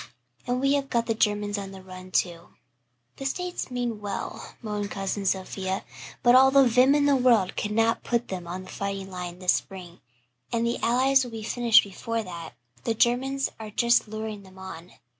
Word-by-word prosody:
And 245 +1 0
we 275 +1 +2
have 280 -1 0
got 235 -2 +1
the 225 - 0
Germans 205 -1 0
on 195 -1 -6
the 190 -1 -11
run, 185 0 -10
too." 175 -2 -1 0.6
"The 270 - -6
States 360 +3 -3
mean 240 -4 -3
well," 205 -1 -5
moaned 210 -2 -3
Cousin 195 0 -3
Sophia, 190 0 -2 0.4
"but 240 - +6
all 265 +1 +8
the 275 0 +6
vim 250 +4 +5
in 290 -1 +3
the 285 -1 +4
world 240 -7 +3
cannot 225 +2 +1
put 240 0 0
them 180 -2 -5
on 180 +2 -5
the 185 - -11
fighting 195 -1 -4
line 180 -1 -6
this 180 -1 +3
spring, 180 -3 -6 0.5
and 235 0 0
the 235 +1 -1
Allies 260 +3 +4
will 245 - -6
be 225 -2 -7
finished 235 0 +5
before 225 +3 -4
that. 170 -4 -8 0.3
The 230 - 0
Germans 265 +4 +1
are 220 -1 -7
just 235 +2 +3
luring 215 -1 -5
them 190 -1 -16
on. 185 -2 -9
215 Hz, 190 wpm, -26 LUFS, 190-245 Hz, 0.6 s, all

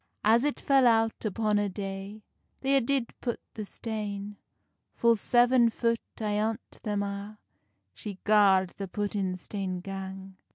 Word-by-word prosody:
As 225 +3 +5
it 295 0 0
fell 270 -2 +4
out 225 -1 +2
upon 215 0 +1
a 205 -1 0
day, 195 +2 -6 0.4
They 275 0 +2
a 270 - +5
did 255 -1 0
put 240 -2 -2
the 215 - -5
stane; 205 -2 -5 0.6
Full 235 0 +4
seven 240 +2 +4
foot 230 0 0 0.2
ayont 215 +2 -2
them 205 -2 -1
a 200 +1 -5 0.6
She 200 - -7
gard 195 -3 +5
the 195 - -4
puttin 195 -2 -2
stane 185 -1 -4
gang. 190 0 -7
210 Hz, 140 wpm, -29 LUFS, 195-230 Hz, 0.6 s, As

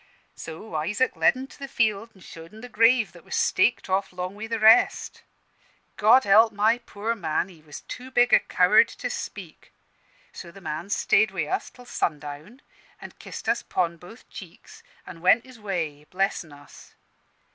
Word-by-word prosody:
"So 165 +5 -10
Isaac 205 +12 -1
led - - +3
'en 260 - -6
to 270 - -17
the 275 - -6
field 220 -3 0
and 190 - -18
showed 165 +4 -12
'en 220 - -12
the 250 - -10
grave 230 0 +3
that 170 -2 -16
was - - -6
staked 230 +6 +1
off 195 +1 -1
'long 180 +1 -5
wi' 215 +2 -7
the 230 0 -3
rest. 225 +3 +4 0.7
God 225 +5 +5
help 220 +3 +5
my 220 +3 +2
poor 225 -1 -4
man! 170 -3 -2
he 170 -4 -17
was 150 -1 -11
too 255 +1 -9
big 245 -1 +2
a - - +8
coward - - +4
to - - -6
speak. - - -8 0.6
So 175 - -10
the 195 - -14
man 170 +1 -6
stayed 210 +2 +2
wi' 185 -5 -3
us - - -3
till 250 - -16
sundown, 155 - -5 0.4
an' - - -10
kissed - - -9
us 230 +1 +1
'pon 170 -2 -2
both 180 +8 -15
cheeks, 180 -3 -13 0.2
an' 165 -2 -11
went 220 +7 +4
his 255 -3 -15
way, 165 -8 -4
blessin' 185 -4 -2
us. 145 0 -16
200 Hz, 180 wpm, -25 LUFS, 170-230 Hz, 0.7 s, a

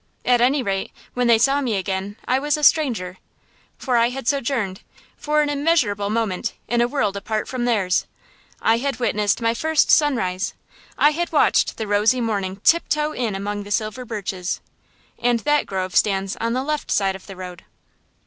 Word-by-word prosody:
At 245 -1 +3
any 265 +2 +3
rate, 195 -2 -2 0.2
when 245 -1 0
they 230 -1 +6
saw 275 +5 +3
me 240 -6 -1
again, 195 +1 -3
I 255 +1 +2
was 295 +1 0
a 300 - -6
stranger. 225 - +2 0.6
For 250 -3 0
I 235 0 +4
had 265 -1 -6
sojourned, 240 -9 -1 0.3
for 300 0 +1
an 295 - -1
immeasurable 280 -10 +1
moment, 215 -4 -1
in 240 0 +1
a 240 - +3
world 240 -7 -1
apart 215 +2 -3
from 250 -2 -3
theirs. 200 -6 +1 0.6
I 225 +1 +4
had 275 +1 -2
witnessed 210 -2 0
my 230 0 +2
first 315 +5 +2
sunrise; 225 - +2 0.4
I 295 - +5
had 340 +3 -2
watched - - +2
the 220 - -3
rosy 210 +5 +2
morning 200 -5 -2
tiptoe 305 -2 +2
in 235 -8 -2
among 205 +1 -3
the 205 - -9
silver 215 +4 -2
birches. 195 -6 -4 0.6
And 240 -1 +1
that 295 0 +1
grove 185 -1 -3
stands 195 -1 +1
on 230 0 -1
the 255 +1 -1
left 300 +1 -3
side 195 -2 +1
of 190 - -12
the 195 - -9
road. 180 -1 -9
230 Hz, 180 wpm, -22 LUFS, 200-270 Hz, 0.6 s, they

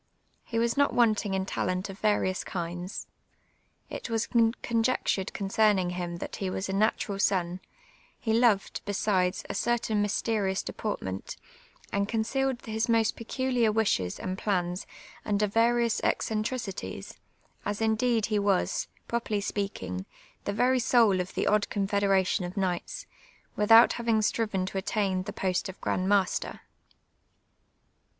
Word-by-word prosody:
He 230 - -4
was 235 0 +1
not 285 0 +2
wanting 215 -4 +3
iiu 190 0 0
talent 185 0 -2
of 195 -1 -9
various 205 -3 +1
kinds. 175 +1 -5 0.8
It - - -6
was 225 -1 0 0.4
conjectured 230 -4 0
concerning 200 -2 +2
him 175 -1 -4
that 170 - -6
he 195 - -2
was 190 +1 -3
a 190 - -3
natural 200 -1 0
son; 180 -2 +1 0.6
he 220 - -1
lovi'd, 225 -4 +2
besides, 195 -2 0
a - - -4
certain 230 -3 0
myste 210 +2 -1
rious 190 -1 -1
deportment, 95 - -4 0.5
and 200 0 0
concealed 250 +3 -1
his 220 +2 -1
most 225 -1 +3
peculiar 245 -1 0
wishes 200 - 0
and 185 +1 -4
])lans 180 -2 0 0.4
under 210 0 +1
various 230 +2 +2
eccentricities, 215 -1 -2 0.4
as 205 0 -2
indetd 225 0 +2
he 215 -2 0
was, 200 -2 +1 0.2
jirojurly 235 -3 -1 0.2
H])eaking, 95 - -3 0.4
the 200 - -1
ver)' 255 +4 +3
soul 230 -6 +4
of 180 - -7
the - - 0
odd 210 0 +2
confederation 195 -1 +1
of 175 +1 -5
knight^ 185 -3 -2 0.5
"without 225 +3 +7
having 230 -2 +1
striven 210 -3 0
to 190 +1 -3
attain 195 -2 0
the 200 +3 -5
post 185 0 -1
of 190 - -9
gnind 185 - -1
master. 195 -2 +1
205 Hz, 135 wpm, -28 LUFS, 190-225 Hz, 0.8 s, without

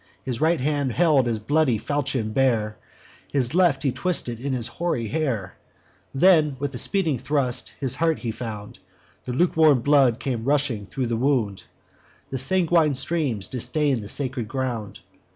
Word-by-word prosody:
His 125 -3 -4
right 160 0 +3
hand 140 -2 0
held 150 -6 +3
his 115 -2 0
bloody 130 +2 +1
falchion 130 -2 -2
bare, 115 -5 +1 0.6
His 135 -2 0
left 170 -6 +3
he 135 - +2
twisted 130 -5 -2
in 140 +3 -3
his 125 -3 -1
hoary 120 -4 -2
hair; 120 -11 -2 0.6
Then, 155 -2 +4
with 140 +1 -4
a 125 - -4
speeding 165 - +2
thrust, 130 -3 -2
his 135 -4 -2
heart 165 -1 +1
he 115 - -4
found: 105 -4 -7 0.5
The 125 - -4
lukewarm 155 -3 +4
blood 135 -3 +3
came 120 -4 -3
rushing 135 -7 0
thro' 130 +3 -3
the 115 -1 -1
wound, 115 -8 0 0.7
And 135 -2 -1
sanguine 165 -1 +2
streams 130 - -1
distain'd 135 0 -1
the 100 - -8
sacred 130 -5 -2
ground. 120 -4 -4
130 Hz, 155 wpm, -24 LUFS, 115-150 Hz, 0.7 s, Then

